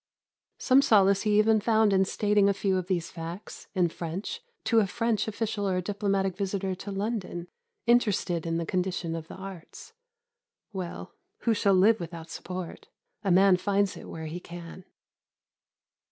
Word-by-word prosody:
Some 260 Hz, +1 st, +5 dB
solace 200 Hz, -5 st, +4 dB
he 210 Hz, -1 st, +2 dB
even 215 Hz, 0 st, +4 dB
found 220 Hz, -1 st, +3 dB
in 190 Hz, 0 st, +4 dB
stating 205 Hz, 0 st, +2 dB
a 200 Hz, -, +1 dB
few 195 Hz, -1 st, 0 dB
of 185 Hz, -1 st, -2 dB
these 175 Hz, -3 st, -1 dB
facts, 170 Hz, +3 st, -8 dB
in 180 Hz, -2 st, +3 dB
French, 180 Hz, -, -5 dB, 0.2 s
to 230 Hz, -, +4 dB
a 205 Hz, -, +2 dB
French 230 Hz, +1 st, 0 dB
official 210 Hz, -2 st, -2 dB
or 180 Hz, -1 st, +1 dB
diplomatic 195 Hz, -1 st, -1 dB
visitor 195 Hz, -1 st, -2 dB
to 195 Hz, +2 st, -7 dB
London, 195 Hz, -4 st, -3 dB, 0.4 s
interested 205 Hz, -8 st, +2 dB
in 165 Hz, 0 st, 0 dB
the 170 Hz, -, -2 dB
condition 180 Hz, -2 st, -2 dB
of 165 Hz, -1 st, -6 dB
the -, -, -9 dB
arts. 190 Hz, -, -10 dB, 0.8 s
Well, 185 Hz, -3 st, -6 dB, 0.3 s
who 230 Hz, -, +2 dB
shall 200 Hz, -2 st, +3 dB
live 210 Hz, +4 st, +5 dB
without 165 Hz, -1 st, -7 dB
support? 185 Hz, -, -7 dB, 0.4 s
A 195 Hz, -, 0 dB
man 185 Hz, +1 st, +6 dB
finds 200 Hz, +1 st, +1 dB
it -, -, -10 dB
where 160 Hz, -1 st, -6 dB
he 160 Hz, +3 st, -5 dB
can. 175 Hz, +1 st, -10 dB
195 Hz, 160 wpm, -28 LUFS, 175-210 Hz, 0.8 s, man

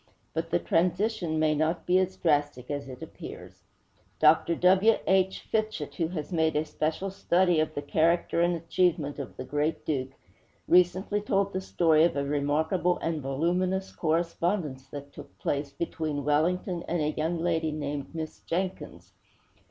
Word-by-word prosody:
But 165 Hz, +1 st, -2 dB
the -, -, +2 dB
transition 180 Hz, 0 st, 0 dB
may 155 Hz, -1 st, +3 dB
not 155 Hz, +3 st, 0 dB
be 180 Hz, +1 st, +4 dB
as 185 Hz, 0 st, -1 dB
drastic 145 Hz, -5 st, 0 dB
as 140 Hz, -1 st, -4 dB
it 130 Hz, -, -8 dB
appears. -, -, -10 dB, 0.6 s
Dr. 160 Hz, +2 st, +4 dB
W. 190 Hz, +6 st, +5 dB
H. 190 Hz, 0 st, +2 dB
Fitchett, 215 Hz, -1 st, -2 dB
who 165 Hz, -3 st, -1 dB
has 165 Hz, 0 st, -5 dB
made 160 Hz, -2 st, +2 dB
a 150 Hz, +1 st, +1 dB
special 160 Hz, +6 st, -2 dB
study 180 Hz, -3 st, +2 dB
of 155 Hz, 0 st, -1 dB
the 145 Hz, -, -3 dB
character 165 Hz, +3 st, +2 dB
and 175 Hz, 0 st, +3 dB
achievements 165 Hz, -3 st, 0 dB
of 140 Hz, -, -7 dB
the -, -, -5 dB
great 150 Hz, +4 st, -2 dB
Duke, 135 Hz, -3 st, -2 dB, 0.5 s
recently 185 Hz, +4 st, +3 dB
told 200 Hz, -1 st, 0 dB
the 185 Hz, -, -2 dB
story 160 Hz, -4 st, +3 dB
of 170 Hz, -, +2 dB
a 140 Hz, 0 st, -1 dB
remarkable 155 Hz, +5 st, +1 dB
and 160 Hz, -2 st, -2 dB
voluminous 180 Hz, +8 st, 0 dB
correspondence 165 Hz, -3 st, -1 dB
that 140 Hz, 0 st, -9 dB
took -, -, -12 dB
place 140 Hz, 0 st, -2 dB
between 150 Hz, -2 st, -3 dB
Wellington 170 Hz, +4 st, +1 dB
and 175 Hz, -, -1 dB
a 150 Hz, 0 st, +1 dB
young 160 Hz, +3 st, -1 dB
lady 165 Hz, -2 st, 0 dB
named 145 Hz, 0 st, -4 dB
Miss 160 Hz, -1 st, -5 dB
Jenkins. 185 Hz, +2 st, -4 dB
165 Hz, 160 wpm, -28 LUFS, 150-180 Hz, 0.6 s, W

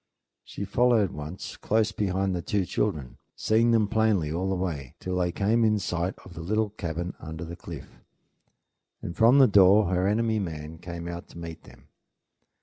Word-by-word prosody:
She -, -, -6 dB
followed 120 Hz, -6 st, +3 dB
once 75 Hz, +5 st, -7 dB
close 110 Hz, -1 st, +1 dB
behind 95 Hz, -2 st, -1 dB
the 90 Hz, -, -2 dB
two 100 Hz, +1 st, -1 dB
children, 75 Hz, -, -2 dB, 0.2 s
seeing 115 Hz, +2 st, +2 dB
them 110 Hz, -3 st, +3 dB
plainly 105 Hz, -8 st, +1 dB
all 95 Hz, +3 st, -1 dB
the 95 Hz, -, 0 dB
way, 80 Hz, -9 st, -4 dB
till 90 Hz, 0 st, -3 dB
they 90 Hz, -1 st, +1 dB
came 110 Hz, +6 st, +1 dB
in 105 Hz, -1 st, +3 dB
sight 90 Hz, -2 st, -2 dB
of 95 Hz, -, -12 dB
the 85 Hz, -, -8 dB
little 105 Hz, +4 st, 0 dB
cabin 85 Hz, -3 st, -4 dB
under 80 Hz, +2 st, -7 dB
the 85 Hz, +1 st, -7 dB
cliff, -, -, -10 dB, 1.0 s
and 85 Hz, -, -5 dB
from 115 Hz, +4 st, +5 dB
the 135 Hz, -, +8 dB
door 100 Hz, -1 st, +6 dB
her 90 Hz, +1 st, +2 dB
enemy 110 Hz, +1 st, +1 dB
man 80 Hz, -3 st, -6 dB
came 85 Hz, -1 st, -7 dB
out 85 Hz, 0 st, -6 dB
to -, -, -14 dB
meet 85 Hz, -1 st, -8 dB
them. -, -, -18 dB
95 Hz, 180 wpm, -27 LUFS, 85-105 Hz, 1.0 s, the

